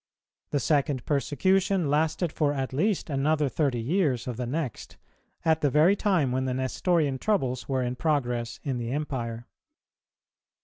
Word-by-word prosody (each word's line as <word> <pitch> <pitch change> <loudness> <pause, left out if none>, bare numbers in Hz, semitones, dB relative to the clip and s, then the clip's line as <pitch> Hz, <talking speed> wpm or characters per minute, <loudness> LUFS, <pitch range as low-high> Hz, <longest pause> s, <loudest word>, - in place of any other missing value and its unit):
The 145 - 0
second 140 -1 +1
persecution 180 +5 +1
lasted 160 +3 +1
for 145 -2 +1
at 135 -2 -3
least 190 +8 0
another 150 +1 +1
thirty 135 -3 0
years 130 -2 0
of 125 - -4
the 125 +1 -4
next, 140 -3 -4 0.5
at 160 -1 +3
the 145 - +3
very 155 +8 +5
time 185 - +1
when 130 +1 0
the 130 -1 -1
Nestorian 140 +2 0
troubles 130 - -1
were 130 -1 +1
in 125 0 -2
progress 125 -6 -1
in 130 -3 -2
the 115 -1 -4
Empire. 120 -5 -3
140 Hz, 150 wpm, -27 LUFS, 125-160 Hz, 0.5 s, very